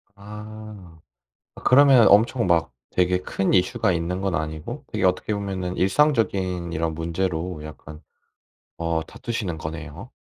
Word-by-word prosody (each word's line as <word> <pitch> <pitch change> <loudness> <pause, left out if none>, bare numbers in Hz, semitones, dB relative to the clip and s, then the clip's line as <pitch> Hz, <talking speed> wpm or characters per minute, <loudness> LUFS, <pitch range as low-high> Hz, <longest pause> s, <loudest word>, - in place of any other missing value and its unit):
아. 105 -4 -11 0.6
아 - - -12
그러면 130 -4 +6
엄청 115 +2 +4
막 85 -6 +2 0.2
되게 90 0 +2
큰 95 +1 -1
이슈가 95 +2 +2
있는 85 +2 -2
건 95 -2 -1
아니고 80 -1 -4
되게 - - -1
어떻게 90 +3 +1
보면은 95 -3 -3
일상적인 95 - +1
이런 80 0 -1
문제로 85 0 -3
약간 75 +1 -10 0.8
어 85 -1 -1
다투시는 105 -8 -4
거네요? 80 -1 -7
90 Hz, 275 characters per minute, -24 LUFS, 85-105 Hz, 0.8 s, 그러면